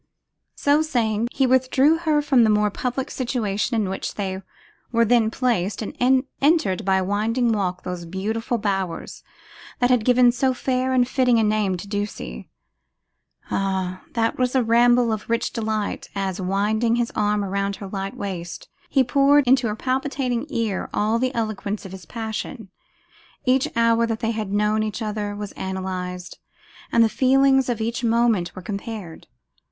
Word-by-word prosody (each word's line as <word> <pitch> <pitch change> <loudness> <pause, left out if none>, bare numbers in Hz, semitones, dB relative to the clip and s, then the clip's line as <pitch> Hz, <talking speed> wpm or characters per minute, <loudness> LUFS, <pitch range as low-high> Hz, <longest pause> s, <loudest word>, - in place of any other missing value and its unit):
So 290 +2 +3
saying, 235 -7 0
he 270 - +1
withdrew 260 +5 +3
her 310 -3 +1
from 265 -4 +4
the 220 - +4
more 210 0 +2
public 255 +4 -3
situation 235 -3 -1
in 205 - 0
which 190 +1 -4
they 190 -2 -3 0.5
were 230 -1 +3
then 230 -1 +3
placed, 220 -5 -1
and - - -6 0.5
entered, 280 - +2
by 190 0 +2
a 190 - +1
winding 225 +5 0
walk, 190 -4 -1
those 180 -1 -5
beautiful 220 +6 -2
bowers 195 -5 -3 0.5
that 245 0 +2
had 245 -3 +3
given 245 0 +5
so 260 +1 0
fair 255 0 -1
and 250 -1 +3
fitting 250 -2 +2
a 225 - +3
name 210 -3 +1
to 190 - -8
Ducie. 205 - -5 1.0
Ah! 190 -1 -1
that 230 +1 0
was 255 0 +1
a 260 - +4
ramble 240 0 +4
of 215 0 -6
rich 230 0 0
delight, 215 -2 -3
as, 195 -1 -2
winding 210 +5 +1
his 240 -1 -1
arm 210 0 0
round 200 +1 -2
her 195 0 -8
light 195 0 -5
waist, 180 -4 -6 0.2
he 270 - +3
poured 280 +3 +4
into 250 -1 +4
her 210 - -2
palpitating 260 +1 -2
ear 225 -7 -2
all 220 +2 +1
the 255 +1 0
eloquence 215 -2 -3
of 190 - -8
his 190 -3 -10
passion. 225 -1 -5 0.8
Each 255 +1 +3
hour 230 0 +3
that 225 -1 -2
they 225 -1 0
had 215 -3 -4
known 210 +1 +1
each 215 -1 -3
other 210 -1 -3
was 205 -1 -6
analysed, 185 -1 -5 0.5
and 230 - +5
the - - +5
feelings 265 +2 +3
of 235 -2 -1
each 230 +2 -2
moment 230 -6 +1
were 185 - -8
compared. 200 -3 -6
220 Hz, 165 wpm, -23 LUFS, 200-250 Hz, 1.0 s, given